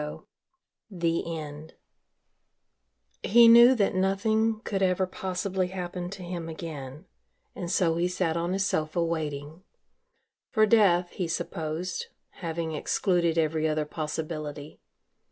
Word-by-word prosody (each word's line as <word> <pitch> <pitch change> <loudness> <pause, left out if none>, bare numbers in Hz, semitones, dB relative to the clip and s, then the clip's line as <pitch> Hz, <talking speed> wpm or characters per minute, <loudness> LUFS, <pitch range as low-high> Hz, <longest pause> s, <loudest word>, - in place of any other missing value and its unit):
IX - - -10 0.7
THE 170 -3 -1
END 150 +1 -8 1.5
He 235 +2 +6
knew 235 +3 +8
that 205 -5 +1
nothing 215 +4 +1
could 195 -2 -2
ever 185 0 +2
possibly 185 0 -2
happen 180 -1 -5
to 190 -1 -8
him 175 -2 -5
again 155 -2 -7 0.5
and 175 - -5
so 170 -3 +2
he 175 +1 +1
sat 180 -2 -1
on 170 +2 -1
his 195 +1 0
sofa 160 -1 0
waiting 155 -1 -4 0.9
for 215 -3 +4
death, 190 -5 +4
he 180 - -3
supposed, 165 +1 -3 0.3
having 165 -1 -3
excluded 170 +1 +1
every 160 0 +1
other 155 0 0
possibility. 155 -1 -5
175 Hz, 120 wpm, -27 LUFS, 160-190 Hz, 1.5 s, knew